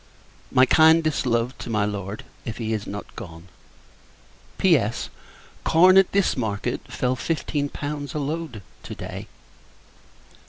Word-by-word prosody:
My 130 - +6
kindest 160 -1 +4
love 120 +1 0
to - - -7
my 105 -2 +1
Lord, 100 0 -5 0.2
if 115 - -5
he 110 -1 -2
is 105 -2 -3
not 105 +1 -7
gone. 85 -5 -10 1.1
P.S. - - +2 0.5
Corn, 180 +3 +6
at 195 -1 +6
this 200 -1 +2
market, 105 -5 -2
fell 125 0 0
fifteen 145 0 -2
pounds 145 -1 -5
a - - 0
load 150 - -4 0.2
to - - -8
day. - - -7
130 Hz, 130 wpm, -24 LUFS, 110-155 Hz, 1.1 s, My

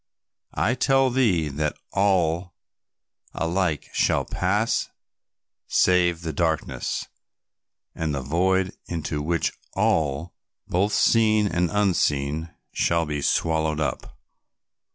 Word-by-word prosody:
I 120 - +2
tell 135 0 +2
thee 105 -12 +2
that 75 +2 -2 0.2
all 90 -3 +1 0.8
alike 85 -2 -1
shall - - +1
pass 105 +5 0 0.8
save 90 -2 +3
the 80 -1 -3
darkness 80 0 -1 0.9
and 80 -3 -2
the 70 - -3
void 95 +6 +1
into 80 -3 -3
which 85 +2 0 0.2
all, 80 +2 0 0.3
both 100 +4 +1
seen 110 -2 +4
and 90 -2 0
unseen 80 -6 0 0.2
shall 85 -1 +1
be 75 -1 -3
swallowed 80 0 +1
up. 75 - -3
85 Hz, 100 wpm, -24 LUFS, 80-95 Hz, 0.9 s, seen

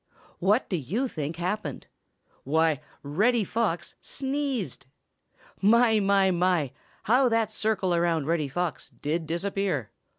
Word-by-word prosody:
What 205 +7 +2
do 180 - -1
you 195 - -1
think 155 - -4
happened? 175 -3 -3 0.6
Why, 160 +1 +2 0.2
Reddy 210 +11 +2
Fox 205 -4 -1
sneezed! 270 - -3 0.7
My, 225 +1 +5
my, 195 -1 +3
my! 175 -6 +1 0.3
How 250 +3 +4
that 225 -2 +1
circle 215 -4 0
around 170 -3 +1
Reddy 160 -2 0
Fox 170 +2 -3
did 160 +2 -3
disappear! 175 - -1
185 Hz, 120 wpm, -27 LUFS, 160-220 Hz, 0.7 s, My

